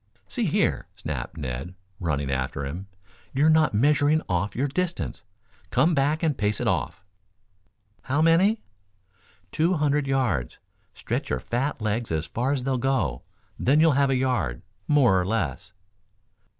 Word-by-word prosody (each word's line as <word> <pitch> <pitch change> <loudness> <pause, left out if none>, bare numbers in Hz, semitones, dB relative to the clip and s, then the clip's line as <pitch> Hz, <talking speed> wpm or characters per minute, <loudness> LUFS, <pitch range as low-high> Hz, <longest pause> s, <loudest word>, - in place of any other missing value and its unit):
"See 240 -4 -2
here," 190 +1 +1
snapped 75 -7 -5
Ned, 70 +5 -5 0.2
running 75 -6 -1
after 65 +1 -2
him. 85 +8 -6 0.5
"You're 150 +4 +4
not 155 -7 +3
measuring 145 +5 +3
off 95 +3 -1
your 135 +4 0
distance. 175 - -3 0.5
Come 150 - +3
back 150 +3 +1
and 155 -4 +2
pace 105 -2 0
it - - -1
off." 95 - -1 1.0
"How 140 +3 0
many?" 175 +7 +4 0.9
"Two 170 +4 +2
hundred 150 -2 +1
yards. 120 - 0 0.4
Stretch - - -3
your 65 - 0
fat 120 - -2
legs 110 0 -1
as 80 0 -1
far 125 +9 -1
as 135 -3 -1
they'll 130 -1 0
go, 120 - 0 0.4
then 140 +4 +3
you'll 160 0 +6
have 140 0 +3
a 135 - +2
yard, 125 - -1 0.2
more 125 -11 +4
or - - 0
less." 90 - -2
130 Hz, 150 wpm, -25 LUFS, 90-150 Hz, 1.0 s, you'll